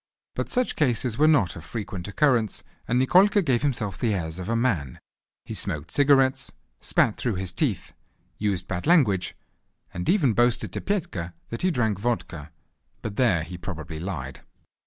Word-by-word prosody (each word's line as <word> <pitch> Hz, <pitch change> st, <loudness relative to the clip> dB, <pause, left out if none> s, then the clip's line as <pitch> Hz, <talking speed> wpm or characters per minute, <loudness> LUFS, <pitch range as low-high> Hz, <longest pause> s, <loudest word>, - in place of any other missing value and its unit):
But -, -, -3 dB
such 250 Hz, -1 st, +1 dB
cases 125 Hz, -4 st, 0 dB
were 155 Hz, -, +6 dB
not 125 Hz, -, +3 dB
of 80 Hz, -, -9 dB
frequent 95 Hz, -1 st, -5 dB
occurrence, 120 Hz, -2 st, +1 dB, 0.2 s
and 120 Hz, -, +1 dB
Nikolka 190 Hz, +9 st, +5 dB
gave 125 Hz, -5 st, +2 dB
himself 115 Hz, -9 st, -1 dB
the 110 Hz, -4 st, +1 dB
airs 80 Hz, -1 st, -4 dB
of 90 Hz, -, -5 dB
a 115 Hz, -, +1 dB
man; 100 Hz, -, 0 dB, 0.5 s
he -, -, -6 dB
smoked 75 Hz, +1 st, -3 dB
cigarettes, 135 Hz, -1 st, +3 dB, 0.3 s
spat -, -, +2 dB
through 120 Hz, -5 st, -1 dB
his 90 Hz, -1 st, -3 dB
teeth, 115 Hz, -, -1 dB, 0.5 s
used 100 Hz, -4 st, -1 dB
bad 90 Hz, +5 st, -3 dB
language, 120 Hz, -, +3 dB, 0.6 s
and 90 Hz, 0 st, -3 dB
even 155 Hz, -, +3 dB
boasted 120 Hz, +2 st, +1 dB
to -, -, -3 dB
Petka 155 Hz, -, -3 dB
that 115 Hz, -, -5 dB
he 185 Hz, -, +2 dB
drank 110 Hz, -, 0 dB
vodka; 95 Hz, -9 st, -3 dB, 0.5 s
but 105 Hz, -2 st, -4 dB
there 105 Hz, -11 st, +3 dB
he 85 Hz, +1 st, -8 dB
probably 80 Hz, -3 st, -6 dB
lied. 70 Hz, -7 st, -5 dB
110 Hz, 165 wpm, -25 LUFS, 90-135 Hz, 0.6 s, were